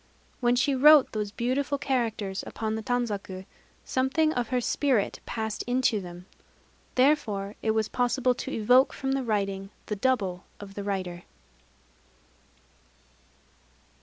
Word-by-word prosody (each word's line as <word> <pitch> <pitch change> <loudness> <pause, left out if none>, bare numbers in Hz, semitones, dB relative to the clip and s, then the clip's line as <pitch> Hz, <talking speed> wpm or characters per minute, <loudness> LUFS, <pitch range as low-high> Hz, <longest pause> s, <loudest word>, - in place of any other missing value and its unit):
When 245 -1 +3
she 270 +3 +2
wrote 290 +1 +7
those 210 -2 -3
beautiful 260 +6 -1
characters 225 -8 -2
upon 220 0 -3
the 220 - -3
tanzaku, 210 -6 -3 0.4
something 290 +5 +1
of 245 -4 -1
her 250 +1 0
spirit 250 -3 0
passed 220 -1 -3
into 245 -4 +1
them. 175 0 -10 0.7
Therefore 225 -8 +2
it 220 - -1
was 215 -1 +1
possible 250 +1 +1
to - - -6
evoke 245 +5 +4
from 270 0 -3
the 270 0 0
writing 200 -4 -2 0.2
the 210 - -3
double 195 -6 0 0.2
of 200 -1 -10
the 200 - -5
writer." 185 -3 -3
230 Hz, 130 wpm, -27 LUFS, 200-260 Hz, 0.7 s, wrote